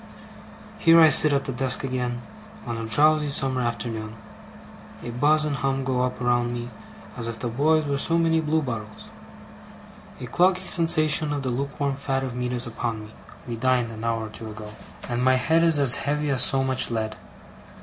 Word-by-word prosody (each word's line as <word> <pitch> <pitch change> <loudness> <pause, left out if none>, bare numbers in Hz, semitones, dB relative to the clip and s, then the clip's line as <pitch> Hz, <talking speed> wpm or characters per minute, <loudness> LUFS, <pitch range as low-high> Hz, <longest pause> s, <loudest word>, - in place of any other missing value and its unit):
Here 165 0 +6
I 160 -1 +7
sit 155 +1 +5
at 140 -1 0
the - - -4
desk 130 +1 -1
again, 125 -2 -3 0.4
on 120 -2 -4
a 115 0 -5
drowsy 150 +6 +3
summer 135 -2 +1
afternoon. 115 -2 -4 0.9
A 120 - -6
buzz 150 +5 +2
and 145 -2 -2
hum 135 -1 -2
go 130 -1 -1
up 125 0 -2
around 120 -1 0
me, 120 0 -6 0.4
as 115 -1 -6
if 115 -1 -5
the 120 - -4
boys 150 +6 +1
were 140 -1 -2
so 165 +4 +1
many 165 -1 +2
bluebottles. 130 -9 -4 1.1
A - - -6
cloggy 180 +8 +1
sensation 155 -3 +3
of 145 -1 -3
the 130 - -2
lukewarm 140 +2 -3
fat 135 -1 -3
of 130 -2 -5
meat 125 0 -3
is 120 -1 +2
upon 115 -1 -4
me 110 - -15 0.3
(we 120 - -4
dined 125 -1 0
an 110 0 -9
hour 115 -1 -2
or - - -8
two 110 +1 -9
ago), 105 0 -9 0.4
and 120 0 -2
my 130 0 +4
head 160 +6 +2
is 165 -2 +3
as 140 -4 +6
heavy 150 +1 -1
as 130 -2 +1
so 135 +1 +2
much 130 -1 +1
lead. 110 -2 -3
130 Hz, 190 wpm, -24 LUFS, 120-150 Hz, 1.1 s, I